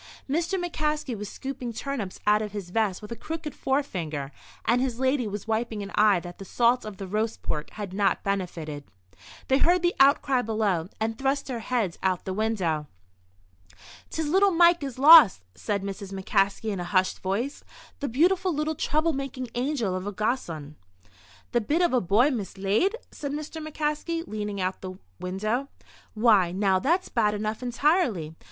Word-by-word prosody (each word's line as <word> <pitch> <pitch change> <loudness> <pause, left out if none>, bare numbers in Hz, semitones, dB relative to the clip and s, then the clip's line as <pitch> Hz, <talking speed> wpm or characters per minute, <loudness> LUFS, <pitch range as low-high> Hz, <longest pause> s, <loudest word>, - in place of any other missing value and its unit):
Mr. 335 +6 0
McCaskey 305 -6 -2
was 210 -1 -6
scooping 265 -3 -5
turnips 225 -7 -4
out 210 +1 +4
of 210 -2 -5
his 195 -4 -6
vest 210 -2 0
with 210 - -9
a - - -3
crooked 310 +5 -6
forefinger, 170 - -2 0.3
and 240 +3 +3
his 255 -3 -1
lady 260 -2 +1
was 205 +1 -6
wiping 220 -1 -1
an 200 - -8
eye 210 -3 +4
that 175 0 -10
the - - -6
salt 240 +4 +2
of 210 -2 -7
the 195 - -6
roast 215 +4 -2
pork 150 -1 -3
had 205 -3 -6
not 200 0 +1
benefited. 170 -7 -3 0.6
They 265 +1 +3
heard 350 +3 +3
the 350 - +3
outcry 270 -2 +4
below, 210 -7 0
and 220 0 -2
thrust 275 +1 0
their 250 -3 -4
heads 225 -6 -1
out 185 -1 +2
of - - -30
the 190 - -4
window. 185 -8 -1 1.2
"'Tis 320 -1 -2
little 385 +6 +4
Mike 345 -1 +5
is 270 -3 -5
lost," 280 - +8
said 200 - -3
Mrs. 195 0 -6
McCaskey, 195 +2 0
in 195 - -3
a - - -2
hushed 185 0 +2
voice, 215 +9 -2 0.4
"the 285 - -2
beautiful, 360 +8 +2
little, 305 0 -1
trouble 310 +2 0
making 265 -2 -4
angel 245 -7 -1
of 185 +2 -4
a - - -2
gossoon!" 170 - -3 0.7
"The 240 - +2
bit 310 +11 +1
of 345 - +2
a 250 - +3
boy 215 - +3
mislaid?" 210 - 0 0.2
said 285 -1 -5
Mr. 305 +1 -5
McCaskey, 310 +2 -2
leaning 210 -1 -4
out 185 0 -1
of - - -36
the 185 -1 -7 0.2
window. 215 +9 -2 0.5
"Why, 215 -6 +4
now, 190 0 +2
that's 345 - +1
bad 210 -3 +1
enough, 215 +2 -3
entirely. 245 - +1
225 Hz, 175 wpm, -26 LUFS, 195-280 Hz, 1.2 s, lost